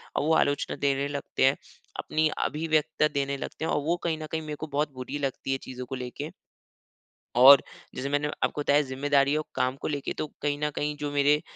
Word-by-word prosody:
और - - +1
वो 160 +2 +2
आलोचना 145 0 +1
देने 140 0 +1
लगते 145 -2 -1
हैं, 135 - +4 0.4
अपनी 155 0 +1
अभिव्यक्ता 155 -1 +1
देने 140 0 -1
लगते 160 - -5
हैं - - -1
और 145 - +1
वो 170 +3 +1
कहीं 165 -2 0
न - - -4
कहीं 160 - -1
मेरे 150 -1 -5
को 155 - -5
बहुत 145 +1 -1
बुरी 130 +3 -5
लगती 135 -1 -3
है 135 - +1
चीज़ों 125 -1 -7
को 130 +1 -5
लेके। 130 +4 -5 1.1
और 135 +2 +10 0.3
जैसे 140 +2 -3
मैंने 145 +1 +1 0.2
आपको 145 - 0
बताया 145 +1 +4
ज़िम्मेदारी 140 +1 +1
और 155 - -1
काम 130 +1 +1
को - - -2
लेके, 145 -2 -2
तो 155 - -3
कहीं 145 0 0
न 150 - 0
कहीं 150 0 -1
जो 145 0 -3
मेरे 145 +1 +3
145 Hz, 215 wpm, -27 LUFS, 135-150 Hz, 1.1 s, और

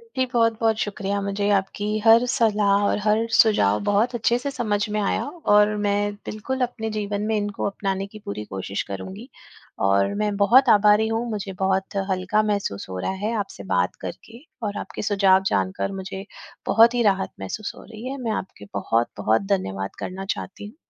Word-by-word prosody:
जी, 260 -1 +2
बहुत-बहुत 230 -2 +2
शुक्रिया। 200 -1 -3
मुझे 200 +1 -1
आपकी 195 +2 -2 0.2
हर 230 +2 +7
सलाह 205 -5 +3
और - - 0
हर 215 +1 +3 0.2
सुझाव 105 - +4
बहुत 220 +5 +2
अच्छे 235 +1 +2
से 280 - -2
समझ 220 -6 -1 0.2
में - - +1
आया 200 - 0 0.3
और 210 0 +5
मैं, 205 0 +1 0.2
बिल्कुल 260 +5 -4
अपने 225 -2 -5
जीवन 205 -1 -2
में - - +2
इनको 205 -1 -2
अपनाने 195 0 -3
की 215 - -9
पूरी 105 +1 -5
कोशिश 95 +1 -3
करूँगी। 95 -1 -7 0.6
और 100 0 +2
मैं 210 - +1
बहुत 240 +6 +5
आभारी 210 +1 +4
हूँ, 225 +1 -1
मुझे 200 -2 -4
बहुत 190 +1 0
हल्का 190 +3 +1
महसूस 195 - -2
हो 95 - -5
रहा 95 - -1
हैं 225 - 0
आपसे 100 - -12
बात 90 0 +1
करके 225 +6 -9 0.2
और 205 -1 -2
आपके - - -7
सुझाव 195 -1 +4
जानकर 195 +1 -1
मुझे, 190 +1 -7 0.5
बहुत 230 +2 +6
ही 240 - +1
राहत 190 0 -3
महसूस 150 - -4
हो - - -12
रही 225 +2 -10
हैं। 275 - -4
मैं 225 - 0
आपके 190 - -15
बहुत-बहुत 110 - 0
धन्यवाद 95 - -3
करना 190 +1 -5
चाहती 195 - -8
हूँ। 215 - -14
205 Hz, 180 wpm, -23 LUFS, 190-220 Hz, 0.6 s, हर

